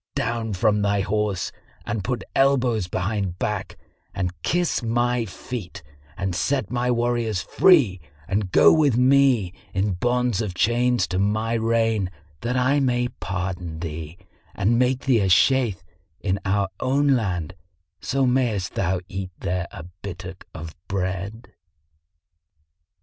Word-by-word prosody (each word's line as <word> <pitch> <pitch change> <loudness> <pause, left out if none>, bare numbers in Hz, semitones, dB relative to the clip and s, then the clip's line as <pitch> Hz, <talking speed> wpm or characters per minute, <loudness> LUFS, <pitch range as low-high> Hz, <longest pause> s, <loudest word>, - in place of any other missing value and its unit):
Down 115 -2 -1
from 105 +2 +2
thy 100 0 +2
horse 105 -1 -1 0.3
and 110 -4 -2
put 125 +2 -2
elbows 125 -7 +3
behind 95 0 -2
back 105 -1 -3 0.4
and 90 -2 -1
kiss 175 - +1
my 120 +1 +1
feet 95 -2 -7 0.3
and 95 -2 -2
set 115 +2 -1
my 125 0 0
warriors 120 -4 0
free 130 - +4 0.3
and 95 -1 -1
go - - +7
with 145 -7 +3
me 130 -7 +4 0.2
in 100 +2 +1
bond 120 +3 0
of 100 -5 -4
chains 120 +4 +2
to 90 +1 -1
my 110 +3 +1
reign 115 -3 +1 0.3
that 125 +2 -1
I 130 +3 +3
may 125 -2 +1
pardon 95 -6 -4
thee 80 0 -6 0.4
and 115 +4 +2
make 125 0 +2
thee 130 -4 +3
a 95 -2 +1
Shaykh 115 +2 +4 0.4
in 95 +1 -1
our 100 0 +1
own 140 +2 +2
land, 95 - 0 0.5
so 135 0 0
mayst 120 -8 +1
thou 95 -1 0
eat 95 0 -5
there 90 0 -2
a 85 - -9 0.2
bittock 95 -1 -8
of 80 0 -8
bread." 100 +4 -4
105 Hz, 135 wpm, -24 LUFS, 95-125 Hz, 0.5 s, go